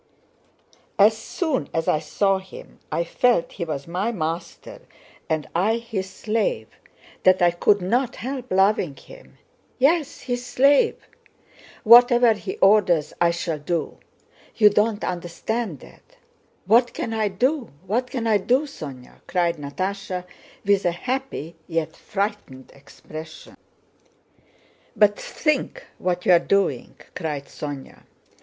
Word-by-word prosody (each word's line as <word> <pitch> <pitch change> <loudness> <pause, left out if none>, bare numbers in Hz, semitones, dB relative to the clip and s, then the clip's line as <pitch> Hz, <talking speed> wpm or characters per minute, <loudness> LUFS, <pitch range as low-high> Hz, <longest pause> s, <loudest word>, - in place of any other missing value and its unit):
As 210 +2 +6
soon 270 - -2
as 165 0 -1
I 155 - +3
saw 195 +5 +1
him 190 0 -13
I 170 - 0
felt 235 +2 +1
he 170 - -5
was 145 -3 -5
my 185 +7 -1
master 170 -4 -5 0.5
and 155 -1 -1
I 205 +7 +2
his 225 -5 -5
slave, 205 - -2
and - - -27
that 185 0 +5
I 175 - +5
could 190 +3 +2
not 245 +6 0
help 255 0 -6
loving 190 -5 +2
him. - - -16 0.4
Yes, 290 +2 +1
his 245 -1 -3
slave! 275 +3 +3 0.8
Whatever 240 0 +7
he 205 -2 -6
orders 190 -6 +3
I 170 - +5
shall 170 -2 -2
do. 165 +2 -3 0.6
You 210 -2 +6
don't 210 +1 +1
understand 180 - -3
that. - - -18 0.5
What 235 +5 +4
can 225 - -3
I 220 -1 +1
do? 250 +7 0 0.2
What 240 +6 -1
can 245 -4 -3
I 220 -2 +4
do, 250 +7 +2
Sónya?" 140 - -10
cried 175 -2 0
Natásha 185 +5 -4 0.4
with 200 -1 +3
a 175 - +2
happy 250 - -4
yet 165 -1 -2
frightened 200 - -4
expression. 155 +3 -11 1.4
"But 205 -1 +4
think 310 +10 -2
what 180 -1 -2
you - - +5
are 175 - +7
doing," 200 +2 0 0.2
cried 150 -5 -4
Sónya. 145 -2 -8
195 Hz, 130 wpm, -23 LUFS, 170-235 Hz, 1.4 s, Whatever